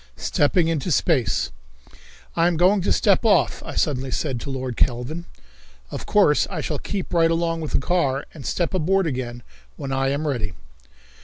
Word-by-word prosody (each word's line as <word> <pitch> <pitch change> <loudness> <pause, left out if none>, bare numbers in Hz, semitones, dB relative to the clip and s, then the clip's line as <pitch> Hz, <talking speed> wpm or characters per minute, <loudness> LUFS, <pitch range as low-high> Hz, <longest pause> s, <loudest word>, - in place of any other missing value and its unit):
Stepping 160 +3 +2
Into 165 0 -1
Space. 130 -7 +1 0.8
"I 170 0 +3
am 175 -2 +1
going 185 +4 +4
to 180 - 0
step 200 -1 +3
off," 220 -3 +3
I - - -7
suddenly 135 -4 0
said 130 -2 -2
to 140 - -7
Lord 130 -2 -3
Kelvin. 130 +9 -1 0.7
"Of - - -6
course 195 -8 +4
I 180 -5 -4
shall 150 -1 -3
keep 195 -3 -4
right 165 -1 +4
along 165 0 0
with 155 - -5
the - - +3
car, 140 -3 0
and 150 - -10
step 175 +5 -1
aboard 190 +2 +2
again 125 -5 -4 0.3
when 135 - -5
I 135 0 +1
am 145 +3 -1
ready." 110 -9 -2
155 Hz, 175 wpm, -23 LUFS, 135-175 Hz, 0.8 s, going